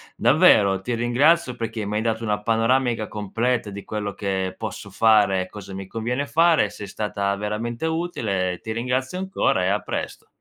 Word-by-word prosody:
davvero 95 -2 +4
ti 120 +5 -3
ringrazio, 125 +4 +2
perché 115 -1 -4
m'hai 105 +1 -2
dato 115 0 -1
una 105 -2 -1
panoramica 115 0 +1
completa 115 +3 -2
di 100 0 -7
quello 105 -2 -4
che 95 -2 -2
posso 105 -1 -7
fare 105 -2 +4
e 95 - -6
cosa 100 -2 -9
mi 95 0 -6
conviene 120 +6 -2
fare, 160 -5 +3
sei 105 0 -8
stata 100 -1 -2
veramente 115 +7 -3
utile, 115 - -1
ehm, 90 - -6
ti 110 - -5
ringrazio 125 +7 -2
ancora 190 - 0
e 90 - +1
a 100 +1 +1
presto. - - -5
110 Hz, 175 wpm, -23 LUFS, 100-125 Hz, -, davvero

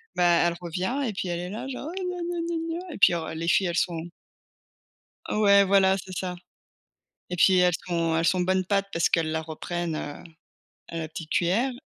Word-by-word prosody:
bah, 175 -1 +4
elle 170 - -1
revient 185 - -2
et 220 - -3
puis 190 - -3
elle 170 0 -2
est 180 +1 -5
là 220 +5 -5
genre: 270 +2 -6
«Ouais, 370 +3 -5
gna, 360 0 -3
gna, 345 0 -3
gna, 330 -1 -3
gna» 360 -2 -8
et - - -7
puis 185 - +6
alors 160 -2 -3
les 165 +1 -4
filles 185 +2 +3
elles 170 - -2
sont 170 -1 -1 1.2
Ouais, 200 -1 +5
voilà, 190 0 +4
c'est 185 0 -8
ça. 180 -1 -3 0.9
Et 180 - -3
puis, 185 +1 +5
elles 180 0 +4
sont 165 -2 0
elles 165 - +1
sont 185 +2 +2
bonne 185 +1 +1
pâte 200 +1 +1
parce 165 - +2
qu'elles 165 -2 +1
la 160 0 -1
reprennent, 165 +1 -4
heu, 145 0 -6 0.6
à 165 - -7
la 160 -1 -4
petite 160 0 -8
cuillère. 210 +10 +1
180 Hz, 215 wpm, -26 LUFS, 170-205 Hz, 1.2 s, puis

